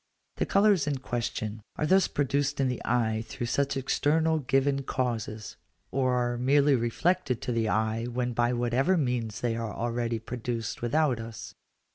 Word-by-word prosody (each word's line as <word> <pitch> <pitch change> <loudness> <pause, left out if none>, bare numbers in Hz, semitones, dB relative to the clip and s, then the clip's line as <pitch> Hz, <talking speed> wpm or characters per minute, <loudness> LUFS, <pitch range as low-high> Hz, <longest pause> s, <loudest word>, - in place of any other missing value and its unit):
The - - 0
colours 200 -7 +4
in 145 -2 0
question 115 -4 -3
are - - -1
thus 190 +4 +4
produced 145 0 0
in 135 - +3
the 125 - -3
eye 110 -2 +1
through 130 +1 -4
such 140 +3 0
external 155 +4 +1
given 135 0 +1
causes, 115 -5 -3 0.3
or 130 -2 +1
are 120 -1 0
merely 140 +3 +4
reflected 130 +3 +1
to - - -2
the 115 -2 0
eye 110 +2 0
when 125 0 -2
by 120 +1 +2
whatever 125 +9 +1
means 120 -7 -1
they 120 -2 0
are 115 -2 -3
already 120 0 -1
produced 115 0 -4
without 130 +1 +1
us. 115 0 -8
125 Hz, 160 wpm, -28 LUFS, 115-140 Hz, 0.3 s, colours